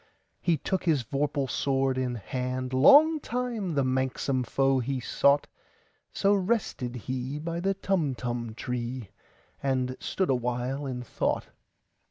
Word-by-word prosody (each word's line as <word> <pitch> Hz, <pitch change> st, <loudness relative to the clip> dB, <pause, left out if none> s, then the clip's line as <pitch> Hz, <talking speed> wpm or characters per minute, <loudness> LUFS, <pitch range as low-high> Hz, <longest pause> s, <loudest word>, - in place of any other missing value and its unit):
He 170 Hz, -2 st, +2 dB
took 185 Hz, +6 st, -2 dB
his 155 Hz, -7 st, +2 dB
vorpal 140 Hz, +2 st, -1 dB
sword 135 Hz, 0 st, +1 dB
in 130 Hz, -1 st, -1 dB
hand:Long 130 Hz, -, +4 dB
time 235 Hz, -, -3 dB
the 140 Hz, -, +3 dB
manxome 130 Hz, 0 st, 0 dB
foe 135 Hz, +2 st, +2 dB
he 130 Hz, +2 st, -2 dB
sought—So 145 Hz, +9 st, 0 dB
rested 190 Hz, -, -1 dB
he 130 Hz, +3 st, -4 dB
by 165 Hz, +2 st, -3 dB
the 195 Hz, +2 st, 0 dB
Tumtum 125 Hz, -, -2 dB
tree, 125 Hz, -2 st, -4 dB, 0.5 s
And 130 Hz, -2 st, 0 dB
stood 190 Hz, -6 st, 0 dB
awhile 125 Hz, +3 st, -1 dB
in 125 Hz, -2 st, -4 dB
thought. -, -, -2 dB
135 Hz, 120 wpm, -28 LUFS, 125-165 Hz, 0.5 s, hand:Long